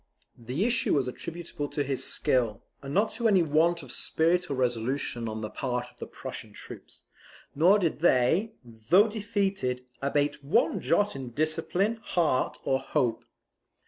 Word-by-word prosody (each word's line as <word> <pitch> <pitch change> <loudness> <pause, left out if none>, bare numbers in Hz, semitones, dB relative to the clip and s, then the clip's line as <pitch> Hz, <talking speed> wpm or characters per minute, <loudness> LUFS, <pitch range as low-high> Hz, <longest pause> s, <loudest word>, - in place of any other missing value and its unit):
The 125 - -2
issue 240 -8 +2
was 135 -3 +1
attributable 165 +2 -5
to 145 - -2
his 135 -1 -2
skill, 115 -5 0 0.2
and 135 - -7
not 205 +7 +2
to 230 0 0
any 190 -5 +4
want 165 +2 +2
of 130 - -10
spirit 175 +6 +1
or 140 - -1
resolution 120 -1 -1
on 110 0 -5
the 110 - -4
part 125 -2 -3
of - - -30
the - - -6
Prussian - - -8
troops; - - -12 0.5
nor 175 +8 +5
did 170 -7 -1
they, 170 - +3
though 120 - +3
defeated, 195 - -2 0.2
abate 145 +1 0
one 200 - +2
jot 205 -4 +1
in 130 -2 -6
discipline, 165 - -1
heart, 165 - 0
or 135 - +1
hope. 120 -4 -1
145 Hz, 155 wpm, -28 LUFS, 125-185 Hz, 0.5 s, nor